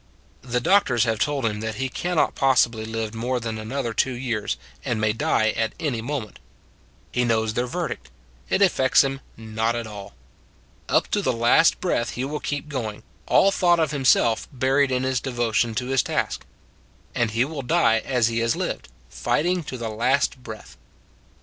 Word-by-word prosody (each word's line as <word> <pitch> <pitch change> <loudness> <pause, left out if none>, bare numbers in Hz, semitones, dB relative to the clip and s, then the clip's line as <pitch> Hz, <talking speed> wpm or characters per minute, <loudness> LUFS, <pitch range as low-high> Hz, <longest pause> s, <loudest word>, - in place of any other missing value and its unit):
The 125 -1 -1
doctors 130 - +3
have 115 -2 0
told 140 -2 0
him 105 -2 -1
that 110 0 -4
he 130 +5 -2
can 175 +7 -3
not 155 - +2
possibly 115 -4 +2
live 110 -1 -4
more 125 +3 -1
than 115 -2 -4
another 115 +2 -3
two 130 +3 0
years, 120 -4 -2 0.3
and 115 -3 -1
may 110 0 +2
die 110 0 +1
at 110 0 -2
any 130 -8 -1
moment. 120 -4 -5 0.7
He 125 - +1
knows 110 -2 +1
their 120 +2 -1
verdict: 60 - -4 0.4
it 200 - +3
affects 135 -10 +4
him 135 0 -3 0.2
not 110 +1 -1
at 120 -1 -3
all. 105 -2 -9 0.7
Up - - +3
to 205 - +1
the 130 - +1
last 120 +7 +4
breath 120 -10 -1
he 125 - -3
will 150 +2 -3
keep 145 0 -4
going, 115 -8 -4 0.2
all 195 - +5
thought 175 -3 +3
of 155 -2 +1
himself 130 -5 +3
buried 135 +1 +2
in 130 0 0
his 130 -1 0
devotion 120 -2 0
to 125 - -1
his 135 -1 +2
task; - - -2 0.7
and 120 -2 +1
he 115 +3 +1
will 150 -1 -5
die 125 -4 +3
as 125 -2 +1
he 115 0 -1
has 115 0 +1
lived, - - -3 0.2
fighting 175 +3 0
to 130 - -5
the 115 -2 -4
last 125 +4 +1
breath. 110 - -10
120 Hz, 180 wpm, -24 LUFS, 110-135 Hz, 0.7 s, all